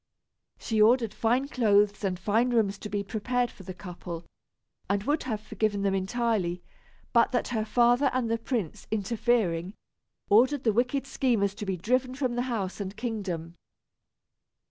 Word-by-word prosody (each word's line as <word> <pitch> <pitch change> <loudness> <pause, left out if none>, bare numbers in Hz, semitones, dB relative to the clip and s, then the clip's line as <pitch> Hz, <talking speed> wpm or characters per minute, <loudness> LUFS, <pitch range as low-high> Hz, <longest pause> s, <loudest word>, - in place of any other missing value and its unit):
She 220 -2 0
ordered 230 -1 +4
fine 245 +6 +1
clothes 210 -6 +2
and 185 -2 0
fine 220 +6 +1
rooms 210 -5 +1
to 210 - -6
be 205 0 -2
prepared 240 +5 -1
for - - -14
the 185 0 -7
couple, 175 -2 -7 0.6
and 200 0 +1
would 295 +5 +1
have 220 -5 -2
forgiven 210 -1 -1
them 195 -1 +2
entirely, 195 -3 -1 0.5
but 235 +1 +4
that 245 - 0
her 220 -3 0
father 245 +4 +4
and 255 -2 0
the 230 0 0
prince, 225 - -3
interfering, 210 -4 0 0.5
ordered 255 +6 +4
the 220 - +3
wicked 250 +4 +1
schemers 230 -8 +1
to 210 0 -7
be 190 -1 -1
driven 255 +7 0
from 255 -3 -1
the 245 - 0
house 200 -6 -3
and 195 +1 -6
kingdom. 195 -8 -4
220 Hz, 160 wpm, -28 LUFS, 195-245 Hz, 0.6 s, ordered